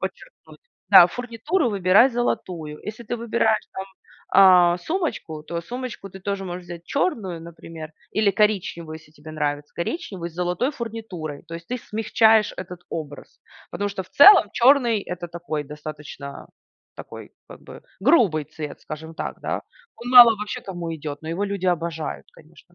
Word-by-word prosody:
подчеркнуть". - - -9 0.3
Да: 175 - +10
"Фурнитуру 245 - -2
выбирай 200 +4 +5
золотую. 175 -10 -3
Если 215 +2 -6
ты 240 +3 -3
выбираешь, 225 -1 0
там, 190 - -5 0.5
а, 180 -2 +6
сумочку, 235 - -3
то 170 +2 -5
сумочку 245 -1 -7
ты 190 - -11
тоже 200 0 -3
можешь 180 0 -6
взять 175 -1 -9
черную, 215 - -2
например, 165 -1 -10 0.3
или 210 -2 +4
коричневую, 190 -7 0
если 155 -1 -21
тебе 155 +1 -12
нравится 145 -1 -3
коричневый, 195 - -5
с 165 - -18
золотой 180 +9 -1
фурнитурой. 220 - -7
То 165 - -7
есть 170 0 -9
ты 250 - -2
смягчаешь 220 0 +2
этот 180 -1 -7
образ. 150 -3 -8 0.3
Потому 205 - -2
что 195 -1 -5
в 185 - -20
целом 385 - +8
черный- 240 -3 +4
это 175 -1 -6
такой 165 -3 -5
достаточно 150 -1 -9 0.5
такой, - - -10 0.2
как - - -12
бы, - - -12 0.2
грубый 200 - +3
цвет, 150 0 -8
скажем 160 +2 -8
так, - - -5
да. - - -3 0.3
Он 245 +1 -7
мало 245 -2 +10
вообще 210 0 -5
кому 175 -3 -6
идет. 150 -1 -7
Но 160 - -7
его 190 +5 -1
люди 195 -2 -3
обожают, 165 -2 -3
конечно, - - -20
185 Hz, 160 wpm, -23 LUFS, 160-225 Hz, 0.5 s, Да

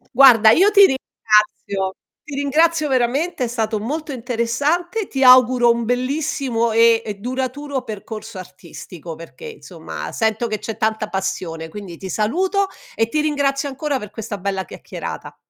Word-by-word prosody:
Guarda 235 -5 +8
io 375 - +5
ti 405 -1 +7
ringrazio, 210 - 0 0.3
ti 295 - -8
ringrazio 305 +3 +2
veramente, 265 +4 0
è - - -3
stato 225 -2 -2
molto 300 +8 -4
interessante, 280 - -1
ti 270 -1 -1
auguro 250 -1 +6
un 235 0 -1
bellissimo 255 -1 -1
e 230 0 +5
e 210 -2 -5
duraturo 260 +4 -4
percorso 215 -1 -8
artistico, 175 -2 -10
perché 170 - -12
insomma 455 -1 -8
sento 220 0 0
che 215 -2 -3
c'è 225 - -6
tanta 220 -1 -1
passione, 175 -4 -4
quindi 180 -1 -9
ti 190 +1 -8
saluto 370 - 0 0.3
e 225 0 0
ti 305 - 0
ringrazio 285 -2 0
ancora 280 +1 -2
per 210 -5 -8
questa 215 -2 -6
bella 190 0 -3
chiacchierata. - - -8
240 Hz, 145 wpm, -20 LUFS, 215-285 Hz, 0.3 s, Guarda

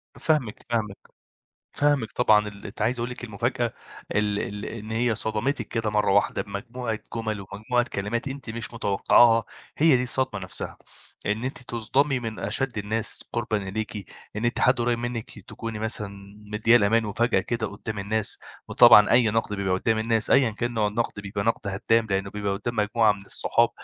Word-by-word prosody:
فاهمِك، 150 -10 -1
فاهمِك. 105 -4 -1 0.8
فاهمِك 145 -7 +1
طبعًا، 105 -3 +3
ال 100 -1 -10
أنتِ 100 - -8
عايز 120 +3 +1
أقول 120 +1 -2
لِك 125 - -8
المفاجأة 120 +2 -2 0.4
ال 105 -1 +1
ال 105 0 -5
إن 110 -1 -7
هي 115 0 +1
صدمتِك 110 +7 -2
كده 110 -2 -2
مرّة 105 -2 +2
واحدة 100 +1 +2
بمجموعة 110 +2 -5 0.2
جُمَل 110 -3 -3
ومجموعة 120 +4 0
كلمات 110 +6 -2
أنتِ 135 -3 -7
مش 115 +1 -5
متوقّعاها 115 +2 +4 0.3
هي 150 -4 +5
دي 125 - 0
الصدمة 130 -3 -1
نَفْسها 95 - -5 0.5
إن 105 +3 -1
أنتِ 130 - -3
تُصدَمي 125 +4 0
من 115 -2 -5
أشَد 115 +4 -2
الناس 110 +2 0
قُربًا 115 -2 0
إليكِ، 110 +2 -4 0.4
إن 110 +3 -2
أنتِ 120 - 0
حد 125 0 +4
قريّب 120 0 +1
منِّك 120 -1 -5
تكوني 115 -2 -7
مثلًا 110 -2 -2 0.4
مدّياه 115 +3 +5
الأمان 110 +1 +2
وفجأة 115 +4 +1
كده 115 -2 -2
قُدّام 105 0 -6
الناس 110 +1 -1 0.3
وطبعًا 105 0 +7
أي 120 -2 +5
نَقْد 110 -1 -1
بيبقى 95 -2 -1
قُدّام 110 +4 +1
الناس 110 -1 +2
أيًا 130 -4 +5
كان 120 +3 -3
نوع 110 -2 +1
النَقْد 105 0 -2
بيبقى 100 0 -4
نَقْد 115 -2 -1
هدّام 110 +4 +1
،لإنّه 95 0 -1
بيبقى 100 -1 -2
قُدّام 115 +4 -4
مجموعة 105 0 +3
من 100 -1 -6
الصحاب 115 +3 +1
110 Hz, 175 wpm, -25 LUFS, 105-120 Hz, 0.8 s, وطبعًا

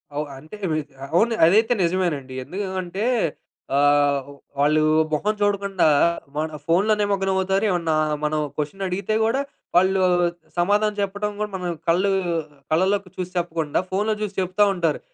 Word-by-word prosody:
అవు 150 +1 -1
అంటే, 155 +8 -11 0.2
వి 155 - +1 0.4
అవును. 225 +7 +3
అదైతే 220 +7 +4
నిజమేనండి. 170 -7 -1
ఎందుకూ 195 +9 -5 0.2
అంటే 190 +5 -3 0.7
ఆహ్, 145 -1 +3 0.3
వాళ్ళు 150 +2 +3 0.3
మొహం 195 +8 +1
చూడకుండా, 200 -2 +1 0.5
మన 155 - 0 0.2
ఫోనులో 190 +6 +3
నిమగ్నమవుతారు. 195 -1 +1
ఏమన్నా 170 -4 0 0.3
మనం 155 0 0 0.2
క్వెషనడిగితే 190 +6 -2
కూడా 245 +5 +1 0.3
వాళ్ళు 190 +2 +4 0.6
సమాధానం 205 +4 +2
చెప్పడం 205 +1 -2
కూడా 210 0 -2
మనం 180 -2 -3 0.2
కళ్ళు 180 +4 +3 0.6
కళ్ళలోకి 190 +4 +1
చూసి 180 0 -4
చెప్పకుండా, 165 -3 -1
ఫోనులో 210 +3 0
చూసి 205 -2 -3
చెప్తా 185 +3 +2
ఉంటారు. 170 -5 0
185 Hz, 125 wpm, -23 LUFS, 160-205 Hz, 0.7 s, అదైతే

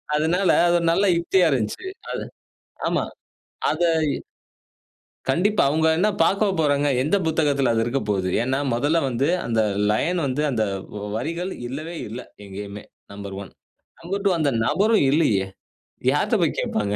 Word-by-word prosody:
அதுனால 175 +5 +1 0.2
அது 175 - +3
ஒரு 170 - -2
நல்ல 195 +4 +2
யுக்தியா 175 +1 +3
இருந்துச்சி. 125 - -2 0.3
அது - - -3 0.7
ஆமா. - - 0 0.7
அத 155 - -2 1.5
கண்டிப்பா. 205 +5 +2
அவுங்க 160 +1 +2
என்ன 205 - +3
பாக்கவா 200 +4 +2
போறாங்க? 145 -1 +2
எந்த 155 +9 +2
புத்தகத்துல 145 -5 +2
அது 115 0 +1
இருக்கப்போவுது. 105 -7 -1
ஏன்னா, 130 +2 0 0.2
மொதல்ல 145 +8 +1
வந்து 130 +4 0 0.2
அந்த 115 -2 +1 0.3
லைன் 175 +12 +1
வந்து 135 +3 -1
அந்த 110 -4 0 0.5
வரிகள் 170 +9 -3 0.2
இல்லவே 155 +6 -6
இல்ல 115 +4 -6 0.3
எங்கயுமே, 100 +1 -7 0.3
1. 100 -1 -7 0.5
2. 195 +3 -1
அந்த 150 -3 +2 0.2
நபரும் 205 +8 +3
இல்லையே. 110 -11 +2 0.7
யார்ட்ட - - +1
போய் - - +1
கேப்பாங்க? 105 -1 -1
145 Hz, 130 wpm, -23 LUFS, 115-170 Hz, 1.5 s, அது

